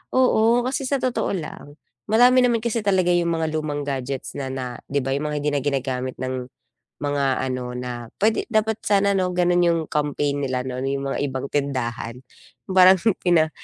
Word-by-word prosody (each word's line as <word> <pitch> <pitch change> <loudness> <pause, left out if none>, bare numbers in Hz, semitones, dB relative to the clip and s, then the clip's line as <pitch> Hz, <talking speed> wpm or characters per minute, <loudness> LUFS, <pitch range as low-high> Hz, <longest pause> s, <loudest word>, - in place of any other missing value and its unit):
oo, 240 -2 +4
kasi 270 +2 -2
sa 280 - +2
totoo 255 -2 0
lang, 150 -3 -8 0.3
marami 245 +3 +6
naman 235 -2 +2
kasi 235 -1 -1
talaga 185 -3 +2
yung 175 -1 +2
mga 160 -1 -1
lumang 150 -2 -2
gadgets 135 -1 -4
na 135 -1 -3
na 125 -2 -5
'di 140 - 0
ba 135 +1 -1
yung 150 +2 -2
mga 150 - -3
hindi 150 +1 0
na 140 - +1
ginagamit 130 -2 -2
ng 130 -1 -4 0.5
mga 145 -1 0 0.2
ano, 125 -1 -4
na 120 -1 -5
pwede 220 +1 +2
dapat 220 -1 +1
sana 200 -1 +3
no, 180 -1 0
ganon 175 0 +3
yung 170 -1 +3
campaign 145 -1 -1
nila 130 -1 -1
no? 130 -1 -4
Yung 135 +1 -2
mga - - -2
ibang 135 0 -4
tindahan. 125 -4 -2 0.5
Parang 185 0 +7 0.2
pina 165 -3 +3
145 Hz, 180 wpm, -23 LUFS, 130-190 Hz, 0.5 s, Parang